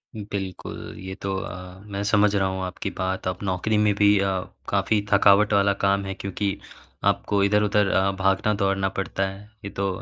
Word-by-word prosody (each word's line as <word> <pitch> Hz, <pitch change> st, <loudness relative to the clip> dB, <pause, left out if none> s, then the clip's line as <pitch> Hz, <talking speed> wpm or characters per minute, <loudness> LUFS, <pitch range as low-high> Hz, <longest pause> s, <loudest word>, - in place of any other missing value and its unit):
बिल्कुल, 100 Hz, -3 st, -5 dB, 0.2 s
ये 95 Hz, +1 st, -6 dB
तो 95 Hz, -1 st, -2 dB
अ, 90 Hz, 0 st, -7 dB
मैं 100 Hz, -1 st, -4 dB
समझ 105 Hz, -1 st, +4 dB
रहा 95 Hz, -1 st, +2 dB
हूँ 95 Hz, 0 st, -4 dB
आपकी 90 Hz, -, -4 dB
बात 95 Hz, 0 st, -2 dB
अब 90 Hz, -1 st, -2 dB
नौकरी 95 Hz, +3 st, 0 dB
में 105 Hz, -1 st, +3 dB
भी 105 Hz, 0 st, +5 dB
अ, 100 Hz, -, +1 dB, 0.4 s
काफ़ी 105 Hz, -1 st, +1 dB
थकावट 100 Hz, +1 st, +5 dB
वाला 100 Hz, 0 st, +4 dB
काम 100 Hz, 0 st, +2 dB
है 95 Hz, -, -3 dB
क्योंकि 100 Hz, +1 st, -3 dB, 0.5 s
आपको 100 Hz, -1 st, -1 dB
इधर-उधर 105 Hz, 0 st, +3 dB
अ, 95 Hz, +1 st, +2 dB
भागना-दौड़ना 95 Hz, 0 st, +1 dB
पड़ता 95 Hz, 0 st, -1 dB
है, 95 Hz, +1 st, -8 dB, 0.2 s
ये -, -, -4 dB
तो 100 Hz, 0 st, -2 dB
100 Hz, 175 wpm, -24 LUFS, 95-105 Hz, 0.5 s, भी